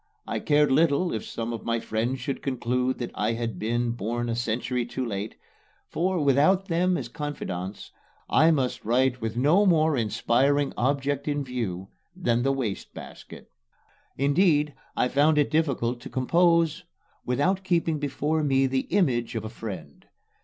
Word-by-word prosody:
I - - -3
cared 150 -2 +3
little 160 +4 +3
if 110 - -3
some 115 +1 -4
of 115 - -6
my 115 0 0
friends 115 +4 -2
should 130 +2 -4
conclude 125 -1 -1
that 120 - -5
I 105 +2 0
had 115 -1 -4
been 120 +2 0
born 120 +2 -3
a 115 - -1
century 120 +1 -1
too 125 +2 -4
late; 105 -1 -4 0.6
for, 180 +2 0
without 150 +8 +3
them 180 +2 +2
as - - -4
confidants, 100 - -6 0.4
I 160 +3 +4
must 135 -6 0
write 125 +2 +1
with 110 +1 -3
no 155 +11 +4
more 160 -3 +3
inspiring 130 +5 +1
object 140 +2 -1
in 145 -1 0
view 105 -8 -4 0.3
than 120 -10 +1
the 135 +2 +2
wastebasket. 125 -8 -6 0.7
Indeed, 150 +1 +3 0.2
I - - +3
found 150 +4 +3
it 145 -1 +2
difficult 135 -6 0
to - - -9
compose 170 +4 +2 0.4
without 180 +10 0
keeping 170 -4 0
before 150 +2 -1
me 135 -2 +3
the 130 0 -1
image 130 - +1
of 110 -1 -3
a - - -4
friend. 95 -11 -8
130 Hz, 155 wpm, -26 LUFS, 120-150 Hz, 0.7 s, I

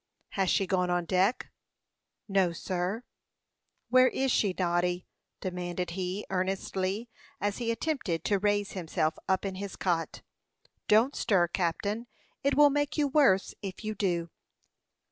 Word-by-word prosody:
"Has 195 -2 0
she 195 - +3
gone 180 -1 +1
on 175 -1 +1
deck?" 190 +7 +1 0.8
"No, 190 -4 +2
sir." 185 +6 -2 0.9
"Where 255 +1 +6
is 265 0 0
she, 205 -4 +3
Noddy?" 175 0 0 0.4
demanded 180 -1 -3
he, 185 +2 -3
earnestly, 190 +3 -1 0.3
as 205 +2 -1
he 235 -1 -1
attempted 230 - -1
to 200 -2 +2
raise 205 0 +1
himself 160 -3 -1
up 190 +1 +2
in 195 - -2
his 195 +1 -6
cot. 170 -3 -1 0.6
"Don't 225 +6 +4
stir, 180 -5 +3
captain; 200 +6 -1 0.4
it 280 +1 +2
will 290 0 +7
make 290 +1 0
you 295 -1 +3
worse, 265 -10 +4
if 195 +1 -6
you 215 0 -2
do." 175 -5 -1
190 Hz, 140 wpm, -29 LUFS, 180-220 Hz, 0.9 s, will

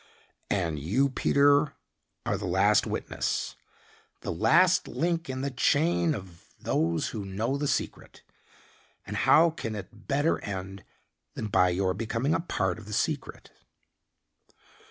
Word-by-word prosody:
And 85 -6 -1
you, 110 - +1
Peter, 140 +2 +3 0.5
are - - 0
the - - -4
last - - +3
witness, - - -2 0.7
the - - -4
last 115 - +4
link 170 -1 -1
in 130 0 -3
the 140 0 -2
chain 155 +4 +2
of 90 -5 -12
those 80 0 0
who 105 - -5
know 105 +7 -2
the 145 +1 -1
secret, - - -3 0.8
and - - -6
how 165 +1 +5
can 115 -9 -5
it 100 -3 -10
better 145 +3 +1
end 95 -1 -6 0.5
than 110 - -4
by 90 -2 +4
your 95 +1 0
becoming 115 +7 -1
a 165 - +1
part 95 - -2
of 105 - -13
the 105 - -6
secret?" - - -3
115 Hz, 135 wpm, -28 LUFS, 95-145 Hz, 0.8 s, how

